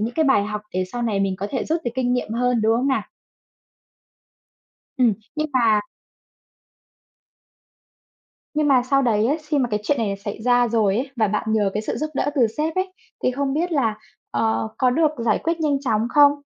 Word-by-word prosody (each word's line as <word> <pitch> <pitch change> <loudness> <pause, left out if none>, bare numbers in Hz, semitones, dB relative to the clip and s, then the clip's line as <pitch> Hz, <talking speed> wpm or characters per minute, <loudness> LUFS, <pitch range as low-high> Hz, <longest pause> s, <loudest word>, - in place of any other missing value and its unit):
những 230 +3 -2
cái 320 - +2
bài 265 -8 +3
học 210 0 -4
để 185 0 0
sau 240 - -3
này 215 -4 0
mình 195 -1 0
có 200 +1 -3
thể 265 - -2
rút 325 +2 -1
được 240 - -1
kinh 250 -1 0
nghiệm 245 -3 -2
hơn, 245 0 +1
đúng 225 +1 +3
không 255 +4 0
nào? 265 - +1 2.0
Ừm, 245 -4 +4 0.2
nhưng 305 0 -1
mà 230 -4 +4 2.7
Nhưng 305 -1 +1
mà 260 -3 +4
sau 275 +2 +2
đấy 225 -4 +2
á, 285 - +2
xi 300 -1 0
mà 250 -3 0
cái 210 -1 0
chuyện 285 +6 +1
này 210 -4 -1
xảy 205 +1 -5
ra 245 +1 +3
rồi 215 -4 +2
ấy, 265 +4 -2
và 220 -3 +2
bạn 210 +1 -1
nhờ 205 -3 +2
cái 210 - -1
sự - - -3
giúp 310 - -2
đỡ 285 - 0
từ 245 -5 +4
sếp 315 +1 -1
ấy, 370 0 -1 0.3
thì 255 - +3
không 275 +1 -1
biết 340 +4 -1
là, 230 -9 +1 0.3
ờ, 220 0 0
có 255 - +3
được 305 +4 +2
giải - - +2
quyết 335 0 -1
nhanh 295 -3 +1
chóng 225 -3 0
không? 290 -1 +7
245 Hz, 210 wpm, -22 LUFS, 220-285 Hz, 2.7 s, không